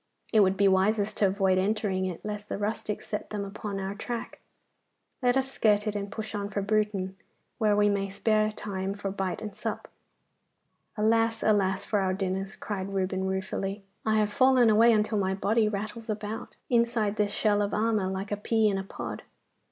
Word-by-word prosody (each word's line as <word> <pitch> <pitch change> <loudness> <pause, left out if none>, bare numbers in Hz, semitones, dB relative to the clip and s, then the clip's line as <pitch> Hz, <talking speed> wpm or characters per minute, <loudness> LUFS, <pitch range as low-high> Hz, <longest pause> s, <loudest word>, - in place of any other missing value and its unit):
It 220 - +6
would 195 -1 +4
be 200 - +4
wisest 200 +2 +2
to 200 - +4
avoid 190 -1 +2
entering 195 -1 0
it, 180 +1 -6
lest 210 0 -5
the - - -2
rustics 210 0 -3
set 210 - -4
them 205 -1 -3
upon 200 0 -5
our 195 0 -3
track. 230 +3 -5 0.8
Let 245 0 +3
us 265 0 -1
skirt 210 -4 +2
it 210 -1 -2
and 200 0 -3
push 220 0 -5
on 205 -1 -3
for 200 -1 -2
Bruton, 200 -2 0 0.4
where 215 -2 +3
we 205 0 +4
may 200 -1 0
spare 215 +2 +1
time 195 -2 -4
for 200 -1 -4
bite 195 +1 -3
and 210 -2 -6
sup.' - - -4 1.1
'Alas, 225 +1 +2
alas! 195 -3 +2
for 210 - +1
our 185 -1 +1
dinners!' 195 0 -2
cried 195 -2 -4
Reuben 190 -1 -1
ruefully. 195 +1 -3 0.2
'I 220 0 +2
have 210 -1 +1
fallen 255 -2 +5
away 225 +2 +6
until 215 -1 +2
my 190 -1 0
body 215 +2 +2
rattles 215 +3 -5
about, 210 +1 -4
inside 235 -3 +1
this 210 -1 +2
shell 205 0 +1
of 205 0 0
armour, 215 -2 +1
like 190 +2 -4
a 205 - 0
pea 220 +1 +2
in 195 -1 0
a - - -3
pod. 195 - -6
205 Hz, 190 wpm, -28 LUFS, 195-215 Hz, 1.1 s, It